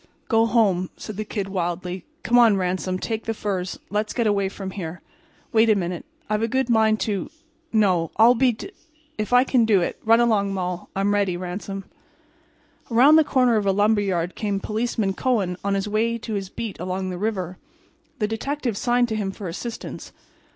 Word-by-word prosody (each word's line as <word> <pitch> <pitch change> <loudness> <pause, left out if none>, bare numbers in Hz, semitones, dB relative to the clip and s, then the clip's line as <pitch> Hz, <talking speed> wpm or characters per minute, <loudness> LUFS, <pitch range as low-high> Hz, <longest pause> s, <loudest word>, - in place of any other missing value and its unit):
"Go 225 -1 +4
home," 200 -6 +2
said 215 - -7
the 215 - -3
Kid, 205 -2 -4
wildly. 180 -1 -3 0.2
"Come 245 +1 +4
on, 225 -4 +6
Ransom—take 185 +4 -2
the 225 - -2
furs. 190 -4 -3
Let's 210 +1 -1
get 235 - 0
away 200 -2 +1
from 195 -1 -6
here. 180 -3 -6 0.5
Wait 225 0 +5
a 215 - +5
minute—I've 215 - -4
a 225 - +1
good 260 +1 0
mind 220 -1 +3
to—no, 220 - -1
I'll 230 +2 +7
be 250 +1 +3
d–––– 225 - -9 0.5
if 215 - -2
I 250 0 +6
can 255 -3 +3
do 210 -4 +4
it—run 225 +6 +2
along, 205 -4 +2
Moll—I'm 185 +2 -2
ready, 200 -3 +1
Ransom." 195 +2 -5 1.1
Around 260 +7 +6
the 315 - +6
corner 255 -5 +3
of 205 -2 0
a - - +5
lumber 205 +2 +3
yard 180 -3 -1
came 205 -2 -2
Policeman 215 -1 -1
Kohen 200 -5 0
on 200 0 0
his 195 +1 -1
way 225 +3 0
to 225 -1 -6
his 195 -2 -3
beat 220 -2 -6
along 185 +1 -3
the 180 - -5
river. 185 -4 -3 0.6
The 210 - 0
detective 240 +1 -3
signed 245 +1 +2
to 220 - -1
him 205 -3 -1
for 195 0 -7
assistance. 225 +7 -6
210 Hz, 180 wpm, -23 LUFS, 190-230 Hz, 1.1 s, I'll